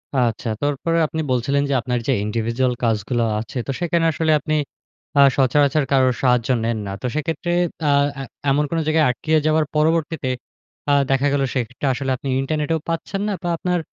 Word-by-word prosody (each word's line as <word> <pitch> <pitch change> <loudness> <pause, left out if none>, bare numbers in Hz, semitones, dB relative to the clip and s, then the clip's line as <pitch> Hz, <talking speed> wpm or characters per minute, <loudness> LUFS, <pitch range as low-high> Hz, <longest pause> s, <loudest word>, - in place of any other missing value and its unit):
আচ্ছা, 120 -2 0
তারপরে 145 +4 0
আপনি 160 +1 -3
বলছিলেন 135 +3 +1
যে, 140 - +1
আপনার 125 +1 -1
যে 135 - +3
individual 115 +4 0
কাজগুলো 115 +1 0 0.2
আছে, 115 +4 -7
তো 135 - -1
সেখানে 170 -1 +1
আসলে 160 +1 0
আপনি 155 - -3 0.7
আ - - +9 0.2
সচরাচর 140 +2 +3
কারোর 130 -2 +3
সাহায্য 125 -1 +2
নেন 115 0 0
না। - - -4
তো - - -5
সেক্ষেত্রে 165 +2 -2 0.4
আ - - +4 0.3
এ - - -4 0.3
এমন 145 +2 +2
কোন 165 - -2
জায়গায় 155 0 +3
আটকিয়ে 155 +6 +1
যাওয়ার 155 0 +3
পরবর্তীতে, 160 -2 +1 0.6
আ - - +4 0.2
দেখা 135 +1 +2
গেল 145 - +1
সেক্ষেত্রে 125 +2 -3
আসলে 135 +1 -2
আপনি 140 - -8
ইন্টারনেটেও 155 +3 -1
পাচ্ছেন 165 +4 -3
না 210 - 0
বা, 175 - -1
আপনার 180 +1 0
140 Hz, 175 wpm, -21 LUFS, 125-160 Hz, 0.7 s, আ